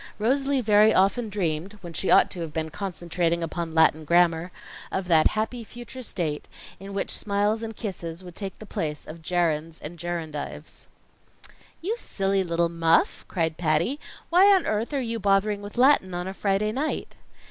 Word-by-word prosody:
Rosalie 270 +4 +1
very 210 -1 +5
often 205 +5 +2
dreamed 180 -2 -2
when 175 -2 -8
she 190 - -1
ought - - +6
to 175 - -5
have 165 -2 -4
been 160 0 -3
concentrating 170 -2 -1
upon 165 0 -4
Latin 160 -1 +4
grammar 170 +1 +3 0.4
of 190 -1 -2
that 160 -2 +6
happy 230 +2 -2
future 240 +3 -10
state 160 -10 -3 0.3
in 195 +1 -8
which 200 - -1
smiles 205 +2 0
and 225 -1 -5
kisses 180 -5 -6
would 180 -2 -11
take 195 -2 -6
the 215 - -10
place 150 -6 -4
of 165 +2 -10
gerunds 165 -2 0
and 165 +3 -9
gerundives. 160 -3 -5 1.0
"You 435 +6 -1
silly 195 - 0
little 170 -1 +1
muff!" 165 -1 +2
cried 165 -3 -1
Patty. 170 - +1 0.3
"Why 365 +3 +7
on 380 -3 +4
earth 215 +5 -1
are 285 - 0
you 230 -3 -3
bothering 200 +1 +2
with 205 +3 -9
Latin 245 -8 +4
on 175 +1 -3
a 190 - -4
Friday 200 +2 0
night?" 280 +7 -3
190 Hz, 170 wpm, -26 LUFS, 165-215 Hz, 1.0 s, Why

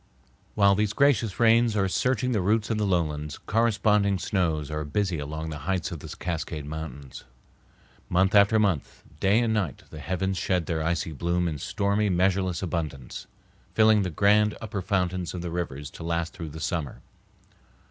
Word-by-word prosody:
While 100 -1 +5
these 105 +1 0
gracious 120 -6 +2
rains 115 -1 +4
are 100 -2 +2
searching 125 +5 0
the 110 -5 +1
roots 110 +4 +1
of 110 - 0
the 105 - +1
lowlands, 75 -5 -1
corresponding 105 -3 +2
snows 80 -7 -1
are 75 0 -2
busy 85 +3 -1
along 80 +2 -5
the 75 - -6
heights 95 -3 -1
of 85 - -5
the - - -9
Cascade 80 -3 -4
Mountains. 70 -3 -7 0.9
Month 95 +3 +2
after 100 +1 +6
month, 100 -9 0 0.2
day 100 +4 +3
and 115 -2 +1
night 95 - -2
the 80 - -8
heavens 95 +4 -2
shed 90 -1 0
their 80 -1 -2
icy 80 0 -1
bloom 85 +3 -1
in 75 -3 -3
stormy, 100 +6 0
measureless 95 -1 +1
abundance, 80 -8 -4 0.5
filling 110 -1 +5
the 95 - -1
grand 105 +5 +3
upper 110 -3 -4
fountains 90 -2 -1
of 90 - -5
the 85 - -4
rivers 75 -5 -4
to - - -11
last 85 0 -2
through 80 -2 -7
the 80 +2 -9
summer. 80 -2 -3
90 Hz, 170 wpm, -26 LUFS, 80-105 Hz, 0.9 s, after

